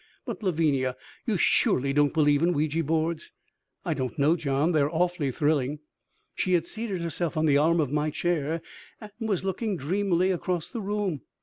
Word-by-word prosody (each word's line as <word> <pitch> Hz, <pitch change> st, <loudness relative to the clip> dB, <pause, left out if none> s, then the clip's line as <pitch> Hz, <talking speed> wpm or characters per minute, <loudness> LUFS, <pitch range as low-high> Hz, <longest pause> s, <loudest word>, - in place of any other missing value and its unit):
"But -, -, -5 dB
Lavinia, 150 Hz, -9 st, +1 dB, 0.3 s
you -, -, +1 dB
surely 135 Hz, +2 st, +2 dB
don't 145 Hz, 0 st, +3 dB
believe 145 Hz, -2 st, +3 dB
in 175 Hz, +1 st, +3 dB
Ouija 155 Hz, +2 st, 0 dB
boards." 160 Hz, +1 st, -1 dB, 0.5 s
"I -, -, 0 dB
don't 130 Hz, +4 st, -4 dB
know, 150 Hz, +3 st, +4 dB
John 145 Hz, 0 st, 0 dB
they 155 Hz, -3 st, +3 dB
are 140 Hz, -, +2 dB
awfully 170 Hz, -3 st, 0 dB
thrilling." 145 Hz, 0 st, 0 dB, 0.6 s
She 185 Hz, -, 0 dB
had 170 Hz, -2 st, +2 dB
seated 205 Hz, -3 st, -4 dB
herself 170 Hz, 0 st, -2 dB
on 155 Hz, -, +2 dB
the 145 Hz, -2 st, +4 dB
arm 165 Hz, +3 st, +3 dB
of 145 Hz, -4 st, 0 dB
my 150 Hz, +1 st, +1 dB
chair 165 Hz, 0 st, -1 dB, 0.4 s
and 215 Hz, -2 st, -10 dB
was 215 Hz, -6 st, -1 dB
looking 195 Hz, +1 st, -1 dB
dreamily 185 Hz, +4 st, +1 dB
across 175 Hz, -2 st, -2 dB
the 235 Hz, -, -5 dB
room. 200 Hz, -, -2 dB
160 Hz, 180 wpm, -27 LUFS, 145-180 Hz, 0.6 s, know